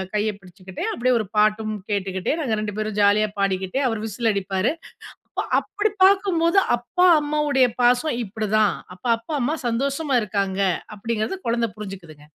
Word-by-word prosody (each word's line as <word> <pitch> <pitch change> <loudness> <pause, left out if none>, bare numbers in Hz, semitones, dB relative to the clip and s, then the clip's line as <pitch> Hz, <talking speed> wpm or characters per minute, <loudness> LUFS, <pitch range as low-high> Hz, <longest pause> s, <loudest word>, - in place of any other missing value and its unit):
கைய 210 +1 +1
பிடிச்சுக்கிட்டே, 185 0 -8
அப்பிடியே 250 +1 +1
ஒரு 215 - -3
பாட்டும் 215 +1 +2 0.2
கேட்டுக்கிட்டே, 190 +2 -1
நாங்க 225 -6 -1
ரெண்டு 210 -1 -4
பேரும் 215 -1 -3
ஜாலியா 205 +1 +4
பாடிக்கிட்டே, 195 +5 0
அவர் 220 -1 -3
விசில் 220 +2 0
அடிப்பாரு! 195 +6 0 0.6
அப்போ - - -2 0.2
அப்பிடி 415 +1 -1
பார்க்கும்போது, 380 -2 +3 0.2
"அப்பா, 360 +10 0 0.2
அம்மாவுடைய 295 -3 +2 0.2
பாசம் 245 +3 +3
இப்பிடிதான். 215 0 +1 0.2
அப்ப 180 - -23
அப்பா, 235 +7 -7
அம்மா 285 +6 0
சந்தோஷமா 275 +3 0
இருக்காங்க." 195 -1 -2 0.3
அப்பிடிங்கிறது 225 - -2
குழந்தை 230 0 +1
புரிஞ்சிக்குதுங்க. 180 -8 -9
215 Hz, 140 wpm, -23 LUFS, 200-265 Hz, 0.6 s, ஜாலியா